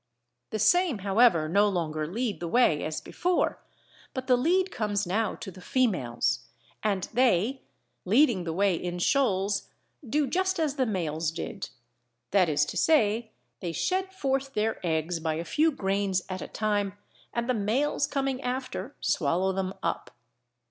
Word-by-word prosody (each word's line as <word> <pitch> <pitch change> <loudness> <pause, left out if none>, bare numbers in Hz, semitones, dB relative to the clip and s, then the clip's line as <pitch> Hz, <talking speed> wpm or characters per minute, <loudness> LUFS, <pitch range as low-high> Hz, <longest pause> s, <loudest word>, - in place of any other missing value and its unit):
The 220 - -2
same 330 - +3
however 195 -6 +4
no 200 +5 +4
longer 155 -5 -2
lead 225 +5 -2
the 175 - -4
way 165 -6 +3
as 155 0 -3
before, 360 0 0 0.6
but 260 -1 -3
the 255 -1 +5
lead 360 +9 +2
comes 205 -2 -1
now 210 +5 0
to 190 - -8
the 185 - -13
females, 180 - 0 0.3
and 200 -4 0
they 245 +1 +2 0.4
leading 225 -1 +3
the 165 - -3
way 195 +3 +2
in 175 +1 -3
shoals 200 -2 +1 0.4
do 295 +4 +2
just 375 +6 0
as 300 -3 0
the 260 -2 +2
males 165 -6 -1
did, 170 +3 -5 0.6
that 190 -4 +4
is 150 0 +2
to - - -5
say 230 -7 +3 0.3
they 170 - -3
shed 375 - -1
forth 270 -6 -2
their 220 0 -1
eggs 165 0 -1
by 160 -1 -1
a 165 +2 -4
few 315 - +2
grains 195 -5 0
at 185 0 -4
a - - -5
time, 205 -2 -1 0.3
and 235 0 -2
the 255 - +2
males 230 +7 +1
coming 270 -1 -1
after 255 +2 -4
swallow 180 +5 +1
them 190 0 -2
up. 170 - -2
205 Hz, 160 wpm, -28 LUFS, 180-260 Hz, 0.6 s, the